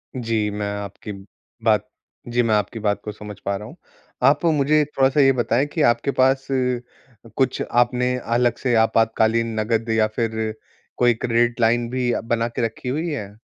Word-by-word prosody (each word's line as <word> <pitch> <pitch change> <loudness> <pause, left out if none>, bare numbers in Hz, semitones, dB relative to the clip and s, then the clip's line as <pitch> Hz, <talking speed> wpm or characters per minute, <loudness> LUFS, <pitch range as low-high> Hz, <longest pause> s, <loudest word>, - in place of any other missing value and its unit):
जी, 115 -4 -1
मैं 105 0 -3
आपकी 100 +1 -7 0.5
बात 105 -2 +2 0.4
जी, 120 +1 +1
मैं 110 -2 +2
आपकी 105 +2 -2
बात 105 -1 -1
को 105 - -5
समझ 105 0 -9
पा 100 - 0
रहा 105 - -9
हूँ। 140 - -12 0.5
आप 140 +6 +4
मुझे 150 -1 +3
थोड़ा-सा 135 0 +1
ये 135 -1 +6
बताएँ 120 +1 +1
कि 155 +2 -3
आपके 120 +1 +2
पास, 135 0 +2 0.9
कुछ 130 -1 0
आपने 125 +1 +2
अलग 120 0 +1
से 130 -3 -1
आपातकालीन 115 0 +2
नगद 115 +1 -1
या 110 -1 +3
फिर 110 -2 -1 0.4
कोई 120 -1 +4
क्रेडिट 120 +1 0
लाइन 115 +1 +2
भी 125 -1 0
बना 115 0 0
के 115 - -4
रखी 115 +3 -5
हुई 155 +6 -2
है? 105 -9 -5
115 Hz, 170 wpm, -22 LUFS, 110-125 Hz, 0.9 s, ये